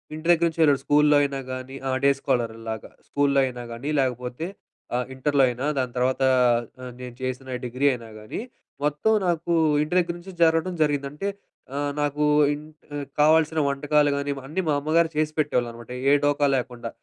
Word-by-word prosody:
ఇంటి 155 +1 -7
దగ్గర 170 0 +4
నుంచి 165 - -11
వెళ్ళుడు. 145 -4 +5
స్కూల్లో 150 0 +4
అయినా 140 -1 -1
గానీ, 130 +1 -6
ఆ! - - 0
డే 140 - +6
స్కాలర్‌ 120 -5 0
లాగా 110 -1 -6 0.2
స్కూల్లో 140 -1 +2
అయినా 125 -1 -5
గానీ, 120 +6 -5
లేకపోతే 125 +3 -2 0.5
ఆహ్, 125 0 0
ఇంటర్‌లో 140 +1 +2
అయినా 125 +3 -4
దాని 125 -2 -2
తర్వాత 130 +2 +1 0.6
ఆహ్, 125 -1 -7
నేను 125 -1 -8
చేసిన 130 0 -4
డిగ్రీ 125 +3 -2
అయినా 115 -2 -8
గానీ, 110 - -6 0.4
మొత్తం 150 +8 +1 0.2
నాకు 170 0 -1 0.3
ఇంటి 155 +4 -3
దగ్గర 170 -1 -1
నుంచి 190 +2 -11
జరగడం 165 +2 +2
జరిగింది. 145 -2 0
అంటే 150 +7 -4 0.5
ఆహ్, 145 0 -1
నాకు 145 0 0 0.3
ఇంట్ 155 +1 -11 0.4
కావాల్సిన 160 +1 +4
వంటకాలు 145 +1 +2
గానీ, 140 0 -2 0.2
అన్నీ 165 +7 -2
మా - - +3
అమ్మగారు 165 +3 +2
చేసి 155 0 +1
పెట్టేవాళ్ళన్నమాట 120 -5 -1 0.2
ఏ - - +6
డోకా 145 0 +2
లేకుండా. 120 -2 -5
145 Hz, 170 wpm, -24 LUFS, 125-155 Hz, 0.6 s, డే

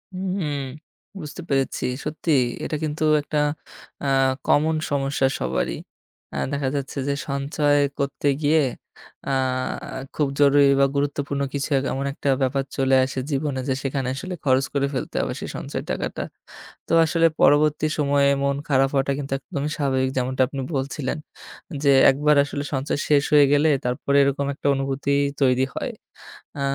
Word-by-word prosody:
হুম, 185 -5 -2 0.6
বুঝতে 150 +3 -7
পেরেছি। 135 -1 0 0.2
সত্যিই 150 -3 +1 0.2
এটা - - -2
কিন্তু 155 0 -2 0.2
একটা 150 +1 -4 0.7
আ - - 0 0.4
common 155 +2 +3
সমস্যা 135 -1 +1
সবারই। 65 +1 -1 0.6
আ - - -2
দেখা 140 -2 -1
যাচ্ছে 140 0 -4
যে 140 - +1 0.2
সঞ্চয় 145 +1 +1 0.2
করতে 140 +1 -1
গিয়ে 155 +2 +4 0.7
আ - - 0 0.8
খুব 150 -2 +1
জরুরি 140 0 +6
বা 140 - +6
গুরুত্বপূর্ণ 140 0 -1
কিছু 140 +2 -2 0.2
এমন 135 +1 -2
একটা 140 - -2
ব্যাপার 135 +1 +1
চলে 135 0 +3
আসে 135 0 -4
জীবনে 140 -1 -1
যে - - +2
সেখানে 135 -1 -2
আসলে 180 +6 -5
খরচ 130 0 +3
করে 140 -1 +1
ফেলতে 130 - -4
হবে - - -2
সে - - -5
সঞ্চয় - - -5
টাকাটা। - - -3 0.6
তো - - -7
আসলে 165 +1 +3
পরবর্তী 150 +1 +4
সময়ে 140 -1 +3
মন 140 0 +1
খারাপ 135 0 +3
হওয়াটা 135 0 +1
কিন্তু 135 -1 -4
একদমই 145 0 -4
স্বাভাবিক। 130 -2 +1
যেমনটা 130 +1 0
আপনি 140 0 -5
বলছিলেন 135 +1 -2 0.7
যে 140 - +5 0.2
একবার 150 +2 +2
আসলে 145 0 -4
সঞ্চয় 135 +1 -1
শেষ 145 -1 +4
হয়ে 145 -1 +7
গেলে 150 +2 +4 0.2
তারপরে 125 +3 0
এরকম 140 0 0
একটা 145 - -4
অনুভূতি 135 +1 -2 0.3
তৈরি 130 0 +3
হয়। - - -3 0.7
আ - - -2
140 Hz, 150 wpm, -23 LUFS, 135-145 Hz, 0.8 s, হয়ে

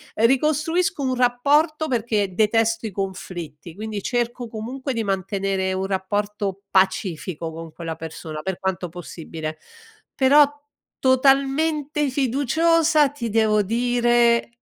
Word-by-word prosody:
Ricostruisco 305 - +1
un 255 -1 0
rapporto 290 +6 +2
perché 215 -6 0
detesto 225 +1 +2
i - - -7
conflitti, 175 -5 -6
quindi 215 -1 -5
cerco 240 0 -2
comunque 255 +5 -5
di 225 -1 -1
mantenere 195 -1 -1
un 190 +1 -2
rapporto 200 0 -2
pacifico 180 -4 0
con 165 0 -8
quella 165 -2 -5
persona, 160 -1 -7
per 190 -2 -3
quanto 185 -2 -2
possibile, 160 -2 -7 0.6
però 285 +2 +6 0.5
totalmente 275 +3 +2
fiduciosa 295 +4 +2
ti 250 -5 -5
devo 215 -1 +3
dire 240 +1 +2
225 Hz, 110 wpm, -22 LUFS, 190-270 Hz, 0.6 s, però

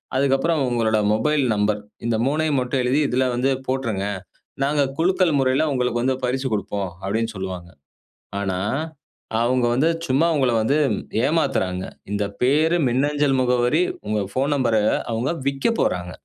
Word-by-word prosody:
அதுக்கப்புறம் 140 +4 +2
உங்களோட 110 -2 +1 0.2
mobile 150 +6 +1
number 105 0 +1 0.3
இந்த 120 -1 +1
3யும் 150 0 +1
மட்டும் 125 +1 -1
எழுதி 130 +4 +2
இதில 130 +1 +1
வந்து 130 +3 +1 0.2
போட்டுருங்க. 115 -7 -1 0.6
நாங்க 145 +1 +2
குலுக்கல் 175 -2 +2
முறையில 130 +3 +2
உங்களுக்கு 125 -2 0
வந்து 130 +2 +1
பரிசு 130 +2 -1
குடுப்போம் 100 -1 -2 0.2
அப்டின்னு 110 +3 -1
சொல்லுவாங்க. 90 -2 -6 0.7
ஆனா, 95 -2 -2 0.8
அவங்க 125 +1 +2
வந்து 145 +7 +2 0.2
சும்மா 150 +3 +2
உங்கள 130 -4 +2
வந்து 135 +7 +2 0.5
ஏமாத்துறாங்க. 135 - 0 0.3
இந்த 105 0 0 0.2
பெயர், 155 +6 +3
மின்னஞ்சல் 140 +2 +1
முகவரி, 125 +5 +2 0.3
உங்க 105 -1 0
போன் 135 +3 +1
நம்பர் 120 -5 +2 0.3
அவங்க 115 +4 -1 0.2
விக்கப் 140 +12 0
போறாங்க. 90 0 0
130 Hz, 135 wpm, -22 LUFS, 110-140 Hz, 0.8 s, பெயர்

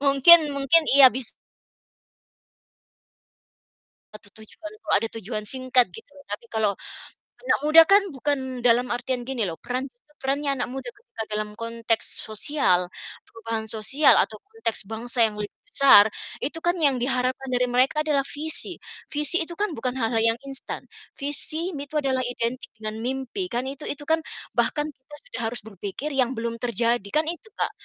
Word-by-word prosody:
mungkin 280 +4 +8 0.2
mungkin, 280 +4 +4
iya, 275 -2 +10
bis 255 -2 -4 2.8
Satu 210 -1 -12
tujuan 315 +9 -11
tuh - - -5
ada 225 +2 -2
tujuan 215 0 -5
singkat 255 -1 +3
gitu. 450 -11 -14 0.2
Tapi 205 +3 -5
kalau 215 -2 +2 0.7
anak - - +1
muda 315 +2 +8
kan 400 +1 +6
bukan 265 -2 -2
dalam 245 +1 +4
artian 245 0 -2
gini 245 -5 -2
loh, 165 - -5
peran 255 +3 -4 0.3
perannya 280 +2 -1
anak - - -1
muda 270 - -6
ketika 475 - -9
dalam 210 0 -4
konteks 230 0 -2
sosial, 215 - 0 0.3
perubahan 225 -1 -6
sosial 230 +7 +4
atau 220 - +1
konteks 435 - -3
bangsa 235 +2 -1
yang 210 - -11
lebih 210 0 -5
besar, 270 - +6 0.3
itu 300 +4 -2
kan 345 +2 0
yang 275 -4 +3
diharapkan 255 +1 -1
dari 250 0 +1
mereka 265 +5 +2
adalah 285 -3 0
visi. 310 +3 +1 0.3
Visi 300 +4 +1
itu 345 - -7
kan 415 +1 -1
bukan 250 +2 -2
hal-hal 230 -2 0
yang 225 0 +3
instan. 275 -1 -5 0.3
Visi 310 +4 -1
itu 295 -1 -3
adalah 260 -1 0
identik 245 +1 -3
dengan 215 0 -6
mimpi, 265 - -3
kan 245 -5 -2
itu 280 +2 -8
itu 290 - -4
kan 320 +2 +1 0.4
bahkan 300 0 +1
kita 270 +1 -17
sudah 235 - -7
harus 240 +2 -4
berpikir 205 - -6
yang 260 -2 0
belum 230 0 -4
terjadi, 235 -2 +1
kan 310 - +4
itu 350 +6 -9
Kak, - - -1
260 Hz, 155 wpm, -24 LUFS, 230-290 Hz, 2.8 s, iya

